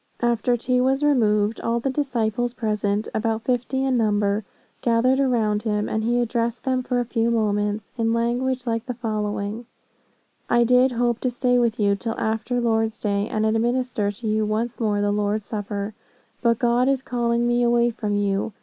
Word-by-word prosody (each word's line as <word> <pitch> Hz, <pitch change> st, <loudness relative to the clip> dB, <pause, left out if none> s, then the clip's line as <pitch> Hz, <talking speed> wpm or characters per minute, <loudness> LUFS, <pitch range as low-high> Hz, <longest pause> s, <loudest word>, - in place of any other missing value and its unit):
"After 240 Hz, +1 st, +2 dB
tea 250 Hz, +2 st, +1 dB
was 265 Hz, +3 st, +1 dB
removed, 220 Hz, -6 st, +2 dB
all 230 Hz, +1 st, 0 dB
the 270 Hz, +3 st, -1 dB
disciples 245 Hz, -3 st, -1 dB
present, 210 Hz, -2 st, -1 dB
about 220 Hz, 0 st, -1 dB
fifty 255 Hz, +2 st, 0 dB
in 260 Hz, -2 st, +1 dB
number, 210 Hz, -1 st, +1 dB, 0.4 s
gathered 245 Hz, +3 st, +2 dB
around 225 Hz, -6 st, +1 dB
him, 210 Hz, -2 st, -1 dB
and 220 Hz, 0 st, -1 dB
he 240 Hz, +2 st, +1 dB
addressed 235 Hz, 0 st, -1 dB
them 260 Hz, -1 st, 0 dB
for 250 Hz, 0 st, -1 dB
a 245 Hz, -, -1 dB
few 230 Hz, -1 st, 0 dB
moments 210 Hz, -2 st, -1 dB
in 225 Hz, 0 st, +2 dB
language 245 Hz, +2 st, 0 dB
like 230 Hz, 0 st, -2 dB
the 250 Hz, -, -3 dB
following: 215 Hz, -1 st, -3 dB, 0.8 s
'I 240 Hz, 0 st, +4 dB
did 250 Hz, +2 st, +4 dB
hope 240 Hz, 0 st, 0 dB
to 255 Hz, -, 0 dB
stay 245 Hz, 0 st, +1 dB
with 235 Hz, -2 st, 0 dB
you 200 Hz, -1 st, +3 dB
till 225 Hz, +2 st, -4 dB
after 225 Hz, +3 st, -1 dB
Lord's 225 Hz, -1 st, 0 dB
day, 200 Hz, -1 st, -1 dB
and 215 Hz, 0 st, 0 dB
administer 225 Hz, -1 st, 0 dB
to 220 Hz, +3 st, -6 dB
you 215 Hz, 0 st, +1 dB
once 220 Hz, +3 st, -2 dB
more 210 Hz, -3 st, 0 dB
the 205 Hz, 0 st, +1 dB
Lord's 205 Hz, 0 st, -1 dB
Supper. 205 Hz, 0 st, -4 dB, 0.5 s
But 235 Hz, -2 st, +3 dB
God 245 Hz, +2 st, +2 dB
is 270 Hz, -1 st, 0 dB
calling 235 Hz, -1 st, 0 dB
me 240 Hz, 0 st, +2 dB
away 240 Hz, 0 st, +3 dB
from 210 Hz, -2 st, -3 dB
you. 200 Hz, +1 st, -1 dB
230 Hz, 180 wpm, -23 LUFS, 215-245 Hz, 0.8 s, I